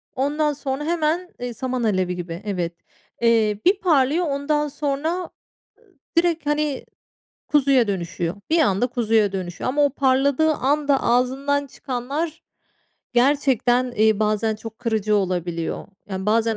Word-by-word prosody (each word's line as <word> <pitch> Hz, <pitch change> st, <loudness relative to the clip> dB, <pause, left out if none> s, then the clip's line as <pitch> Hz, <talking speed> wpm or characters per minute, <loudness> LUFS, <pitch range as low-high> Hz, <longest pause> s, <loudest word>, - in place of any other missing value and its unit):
ondan 295 Hz, +3 st, +1 dB
sonra 275 Hz, 0 st, -4 dB
hemen, 340 Hz, +2 st, 0 dB
iii, 245 Hz, -1 st, -4 dB
saman 255 Hz, +1 st, -3 dB
alevi 185 Hz, -4 st, +1 dB
gibi, 175 Hz, +1 st, -6 dB
evet. 175 Hz, -4 st, -2 dB, 0.5 s
Eee, 220 Hz, -3 st, +3 dB
bir 385 Hz, +2 st, +4 dB
parlıyor, 315 Hz, 0 st, +3 dB
ondan 295 Hz, +1 st, 0 dB
sonra, 290 Hz, +1 st, -2 dB
ııı, 360 Hz, -, -5 dB, 0.9 s
direkt, 335 Hz, -3 st, +1 dB
hani, 295 Hz, -2 st, 0 dB, 0.6 s
kuzuya 275 Hz, -5 st, +3 dB
dönüşüyor. 175 Hz, -2 st, -3 dB
Bir 330 Hz, +1 st, +3 dB
anda 225 Hz, -1 st, +2 dB
kuzuya 225 Hz, -4 st, +1 dB
dönüşüyor 185 Hz, 0 st, -4 dB
ama 290 Hz, +2 st, +2 dB
o -, -, +2 dB
parladığı 275 Hz, +3 st, +2 dB
anda 285 Hz, +1 st, +1 dB
ağzından 270 Hz, +4 st, +1 dB
çıkanlar 280 Hz, +7 st, -4 dB, 0.7 s
gerçekten, 250 Hz, -1 st, +2 dB
iii, 215 Hz, 0 st, +3 dB
bazen 215 Hz, +1 st, +1 dB
çok 220 Hz, 0 st, -10 dB
kırıcı 215 Hz, -2 st, 0 dB
olabiliyor. 175 Hz, -3 st, -2 dB, 0.2 s
Yani 190 Hz, 0 st, -4 dB
bazen 225 Hz, 0 st, +2 dB
255 Hz, 130 wpm, -22 LUFS, 215-290 Hz, 0.9 s, bir